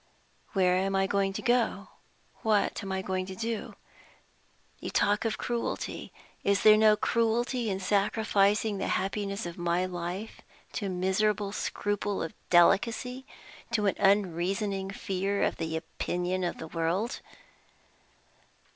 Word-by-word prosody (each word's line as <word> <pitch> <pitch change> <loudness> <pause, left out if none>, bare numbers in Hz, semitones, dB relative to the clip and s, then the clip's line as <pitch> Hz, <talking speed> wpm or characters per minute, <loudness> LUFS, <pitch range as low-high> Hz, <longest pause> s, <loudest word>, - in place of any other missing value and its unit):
Where 185 -2 +3
am 195 +1 0
I 195 0 +3
to - - -2
go 195 -1 +1
to? 235 -1 0 0.5
what 215 -2 +1
am 195 -2 -5
I 190 0 -2
to 190 0 -3
do? 225 +1 -4 1.0
You - - -5
talk 205 +2 +2
of 225 - 0
cruelty! 240 -1 -3 0.3
Is 200 0 +2
there 215 0 +9
no 215 0 +5
cruelty 235 +2 +1
in 190 -1 -1
sacrificing 205 +1 +2
the - - -1
happiness 200 +1 -1
of 170 0 -7
my 175 +1 +1
life 180 +4 -5 0.3
to 200 - -2
a - - -2
miserable 195 +3 +1
scruple 205 -1 -2
of 165 - -5 0.2
delicacy, 235 +9 +3 0.5
to 210 -2 +2
an 195 - +2
unreasoning 195 0 +1
fear 195 +1 -1
of - - 0
the 160 0 -2
opinion 180 +3 -2
of 175 - -2
the 160 - -7
world? 170 +8 -1
195 Hz, 135 wpm, -29 LUFS, 185-215 Hz, 1.0 s, there